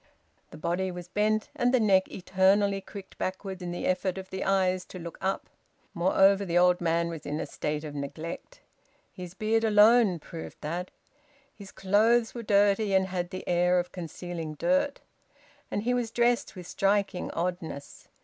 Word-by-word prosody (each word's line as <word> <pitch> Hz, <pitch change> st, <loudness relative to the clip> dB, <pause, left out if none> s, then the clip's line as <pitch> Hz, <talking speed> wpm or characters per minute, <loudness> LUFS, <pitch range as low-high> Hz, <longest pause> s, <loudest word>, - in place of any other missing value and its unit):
The -, -, -11 dB
body 175 Hz, +4 st, -1 dB
was 180 Hz, -1 st, -7 dB
bent, 215 Hz, +3 st, 0 dB
and 245 Hz, 0 st, +2 dB
the 255 Hz, -, +3 dB
neck 195 Hz, -4 st, +3 dB
eternally 195 Hz, +2 st, +2 dB
cricked 195 Hz, -1 st, -11 dB
backward 190 Hz, 0 st, -4 dB
in 175 Hz, -, -4 dB
the 175 Hz, -, -4 dB
effort 185 Hz, 0 st, 0 dB
of 190 Hz, 0 st, -8 dB
the 190 Hz, -, -3 dB
eyes 185 Hz, -1 st, +1 dB
to -, -, -10 dB
look 170 Hz, -1 st, -8 dB
up. 190 Hz, +1 st, -2 dB, 0.5 s
Moreover 195 Hz, +3 st, +4 dB
the 175 Hz, -3 st, 0 dB
old 180 Hz, 0 st, +4 dB
man 170 Hz, 0 st, +1 dB
was 165 Hz, -3 st, -7 dB
in 150 Hz, +1 st, -3 dB
a -, -, -2 dB
state 150 Hz, 0 st, -3 dB
of 150 Hz, -2 st, -6 dB
neglect. 145 Hz, +4 st, -7 dB, 0.5 s
His 180 Hz, -1 st, -9 dB
beard 220 Hz, +2 st, +1 dB
alone 215 Hz, -2 st, +5 dB
proved 165 Hz, +1 st, -9 dB
that. 175 Hz, +4 st, -4 dB, 0.6 s
His 200 Hz, -2 st, -12 dB
clothes 220 Hz, +4 st, +2 dB
were 235 Hz, -, -5 dB
dirty 205 Hz, -1 st, +3 dB
and 190 Hz, 0 st, +2 dB
had 175 Hz, -1 st, -3 dB
the 185 Hz, -, -7 dB
air 180 Hz, +1 st, +3 dB
of 180 Hz, 0 st, -1 dB
concealing 170 Hz, -2 st, -6 dB
dirt. 280 Hz, -, 0 dB, 0.7 s
And 205 Hz, -, -2 dB
he 245 Hz, +2 st, +1 dB
was 245 Hz, -2 st, -1 dB
dressed 240 Hz, -1 st, +1 dB
with 180 Hz, -2 st, -9 dB
striking 195 Hz, 0 st, 0 dB
oddness. 170 Hz, -4 st, -5 dB
190 Hz, 170 wpm, -28 LUFS, 175-205 Hz, 0.7 s, alone